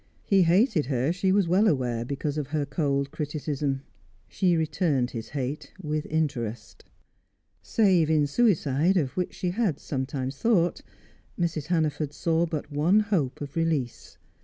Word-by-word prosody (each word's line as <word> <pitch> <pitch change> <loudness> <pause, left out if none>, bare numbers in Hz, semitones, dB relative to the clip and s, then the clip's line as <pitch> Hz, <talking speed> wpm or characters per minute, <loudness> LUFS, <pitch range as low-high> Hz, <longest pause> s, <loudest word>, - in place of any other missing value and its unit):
He 195 -2 +3
hated 180 - +3
her, 135 +3 0
she 185 +1 +1
was 195 -2 +3
well 190 +6 +4
aware, 125 - 0
because 140 +3 -3
of 145 - -4
her 150 -1 -1
cold 140 -1 -1
criticism; 145 -2 -3 0.4
she 180 -3 +1
returned 150 -5 0
his 115 -2 -6
hate 140 +1 -4
with 155 -3 -3
interest. 135 -8 -3 0.8
Save 185 -8 +3
in 155 -2 +3
suicide, 165 - +2
of 140 -7 0
which 180 -1 -2
she 180 - -2
had 195 - 0
sometimes 135 -1 -4
thought, 180 -7 +2 0.6
Mrs. 165 -4 -1
Hannaford 155 -4 0
saw 165 +2 +1
but 155 -2 -5
one 160 +8 +3
hope 180 - -1
of 140 -1 -7
release. 160 -7 -2
155 Hz, 145 wpm, -26 LUFS, 140-175 Hz, 0.8 s, well